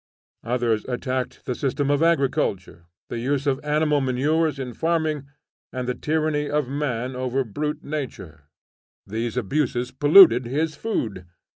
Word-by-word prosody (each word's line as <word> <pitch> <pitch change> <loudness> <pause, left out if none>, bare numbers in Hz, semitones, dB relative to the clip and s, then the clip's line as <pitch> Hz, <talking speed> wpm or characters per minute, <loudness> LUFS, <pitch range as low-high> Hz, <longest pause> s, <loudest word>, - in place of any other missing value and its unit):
Others 115 -2 0
attacked 130 0 -3
the 125 - -1
system 140 +2 -1
of 145 +1 +2
agriculture, 130 - 0 0.2
the 120 - -4
use 140 +3 -1
of 140 0 0
animal 150 -1 +2
manures 145 +4 +1
in 130 -2 -5
farming, 160 -3 -1 0.4
and 125 -1 -4
the 125 - 0
tyranny 155 0 -1
of 150 -3 0
man 130 -3 -2
over 130 +1 -1
brute 150 +7 -4
nature; 95 - -6 0.6
these 115 +4 -3
abuses 125 +1 -1
polluted 145 -2 +7
his 155 +5 -1
food. 110 - -3
135 Hz, 135 wpm, -23 LUFS, 125-150 Hz, 0.6 s, polluted